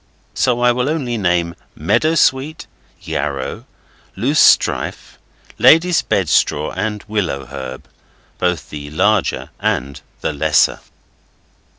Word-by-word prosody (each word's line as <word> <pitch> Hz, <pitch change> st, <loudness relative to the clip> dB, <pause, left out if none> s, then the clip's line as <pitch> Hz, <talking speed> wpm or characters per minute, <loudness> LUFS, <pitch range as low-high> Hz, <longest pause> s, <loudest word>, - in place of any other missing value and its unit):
So 120 Hz, -1 st, +1 dB
I 125 Hz, 0 st, +5 dB
will 125 Hz, +3 st, -1 dB
only 135 Hz, -7 st, -2 dB
name 90 Hz, -5 st, 0 dB, 0.2 s
meadow 115 Hz, -, +1 dB
sweet, 145 Hz, +1 st, +1 dB, 0.4 s
yarrow, 70 Hz, -2 st, -4 dB, 0.5 s
loose 135 Hz, +10 st, +1 dB
strife, -, -, +2 dB, 0.4 s
lady's 165 Hz, +2 st, +5 dB
bed 95 Hz, -4 st, 0 dB
straw 75 Hz, -1 st, +1 dB
and 105 Hz, -1 st, -3 dB
willow 90 Hz, -11 st, -2 dB
herb 65 Hz, -1 st, -8 dB, 0.5 s
both 90 Hz, -4 st, -1 dB
the 75 Hz, -1 st, -7 dB
larger 100 Hz, +6 st, 0 dB
and 70 Hz, +2 st, -2 dB, 0.2 s
the -, -, -2 dB
lesser. 75 Hz, +1 st, +2 dB
100 Hz, 110 wpm, -18 LUFS, 75-125 Hz, 0.5 s, I